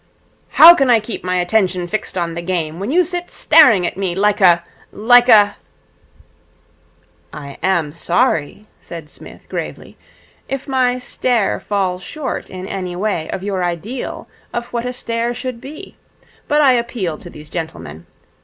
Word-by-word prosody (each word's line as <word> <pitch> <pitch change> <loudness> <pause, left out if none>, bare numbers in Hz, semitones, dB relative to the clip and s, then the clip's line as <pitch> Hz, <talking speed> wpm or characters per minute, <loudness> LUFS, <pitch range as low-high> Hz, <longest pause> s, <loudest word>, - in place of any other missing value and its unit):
'How 340 +1 +10
can 275 -6 +1
I 235 -2 +5
keep 220 +1 -7
my 180 0 -1
attention 180 -1 +1
fixed 195 +1 -4
on 170 -1 -2
the 170 - -5
game 170 -2 -3
when 200 +4 -4
you 355 +6 +3
sit 355 +1 -5
staring 225 - +5
at 175 - -4
me 190 -3 -2
like 205 +1 +1
a 170 -2 +5 0.3
like 245 +3 +4
a 205 -3 +6 0.8
' - - -37
'I 140 -2 -9
am 170 -6 0
sorry,' 165 - -1 0.2
said 165 -3 -10
Psmith - - -14
gravely, - - -7 0.5
'if 270 +1 -4
my 255 -2 +1
stare 245 -3 -1
falls 190 -3 -2
short 300 - -5
in 185 0 -8
any 185 -3 -5
way 180 -4 -2
of 190 - -5
your 195 -2 -2
ideal 180 +9 -5 0.2
of 240 0 -3
what 240 +1 -2
a 250 - -4
stare 235 0 -3
should 250 -2 -6
be; 305 +8 -11 0.5
but 295 +1 +3
I 275 -3 +6
appeal 235 -9 -2
to - - -11
these 150 0 -13
gentlemen. 85 - -7
205 Hz, 165 wpm, -18 LUFS, 175-245 Hz, 0.8 s, How